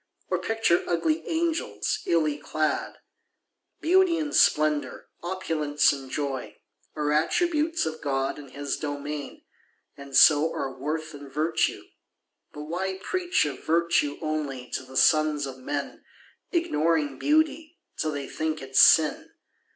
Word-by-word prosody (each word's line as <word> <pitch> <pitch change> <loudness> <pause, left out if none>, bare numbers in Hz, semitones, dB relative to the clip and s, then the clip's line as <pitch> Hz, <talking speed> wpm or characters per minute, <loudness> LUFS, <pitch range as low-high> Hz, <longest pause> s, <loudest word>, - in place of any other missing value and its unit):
Or - - 0
picture 225 -6 +1
ugly 310 - 0
angels, 330 0 -1
illy 155 -3 +1
clad? 155 +1 -2 0.8
Beauty 360 0 +4
and 300 -2 -2
splendour, 150 -3 +2
opulence 165 -5 +1
and 135 -2 -8
joy, 135 -2 -4 0.4
Are 150 -1 -1
attributes 315 - +1
of 160 0 -5
God 135 0 -1
and 140 -2 -11
His 140 +1 -4
domain, 145 -1 -5 0.5
And 140 -1 -9
so 155 +1 +6
are 135 -1 -4
worth 155 +4 -4
and 145 -1 -11
virtue. 155 +3 0 0.7
But 150 - -8
why 185 +5 -3
preach 360 - 0
Of 145 -2 -6
virtue 165 -3 +1
only 145 -5 -3
to - - -2
the 130 0 -8
sons 155 -2 +3
of 130 -1 -8
men, 140 +2 -5 0.5
Ignoring 155 - 0
beauty, 315 +2 +1 0.2
till 155 - -1
they 145 -2 -5
think 155 0 -3
it 135 -1 -10
sin? 155 +3 +5
155 Hz, 130 wpm, -26 LUFS, 145-185 Hz, 0.8 s, so